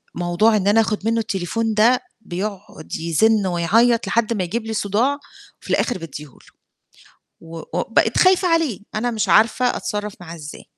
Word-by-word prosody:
موضوع 175 +6 +2
إن 195 0 -1
أنا 220 +2 +5
آخُد 215 -1 -2
منُّه 230 0 +1
التليفون 220 +2 -2
ده 230 +4 +4 0.2
بيقعُد 190 -3 -6
يزِن 190 +6 +2
ويعيّط 220 +6 +2
لحد 230 +2 +1
ما 190 -4 -1
يجيب 225 +6 -3
لي 220 - -4
صداع، 220 +8 0 0.4
وفي - - -13
الآخِر 245 - 0
بادّيه 150 -3 -8
له، 135 - -19 1.0
و 165 0 -10
و 175 - 0
بقيت 225 - +2
خايفة 370 0 +4
عليه، 325 - +1
أنا 240 +3 -1
مش 220 -2 -2
عارفة 230 +3 +3
أتصرّف 210 -1 -4
معاه 170 -1 -9
إزاي. 150 -2 -10
215 Hz, 165 wpm, -20 LUFS, 175-230 Hz, 1.0 s, أنا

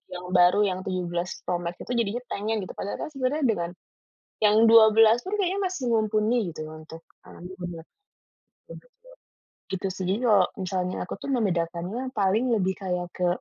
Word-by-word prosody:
yang 180 0 -7
baru 180 +2 +5
yang 185 -1 -2
17 180 -1 -3
Pro 180 - +1
Max 170 +1 -4
itu 245 - -4
jadinya 235 0 0
pengen 215 +2 -2
gitu - - -8
padahalkan 200 - -4
sebenarnya 270 +3 -1
dengan, 175 -6 0 0.7
yang 210 0 +4 0.2
12 225 0 +7
pun 400 - -4
kayaknya 390 -1 0
masih 365 -8 -6
mumpuni 220 +1 +2 0.2
gitu 155 - -5
untuk 155 +1 -11 0.2
mengambil 180 +2 -10
gambar. 175 -2 -7 1.9
Gitu 190 0 -2
sih 190 - -4
jadi 200 +4 +1
kalau 200 -5 +5
misalnya 185 -1 -2
aku - - -5
tuh 280 - -5
membedakannya 190 +2 -1
paling 215 +3 +1
lebih 190 -2 0
kayak 180 -2 -2
ke, 180 -1 0
195 Hz, 155 wpm, -26 LUFS, 180-225 Hz, 1.9 s, 12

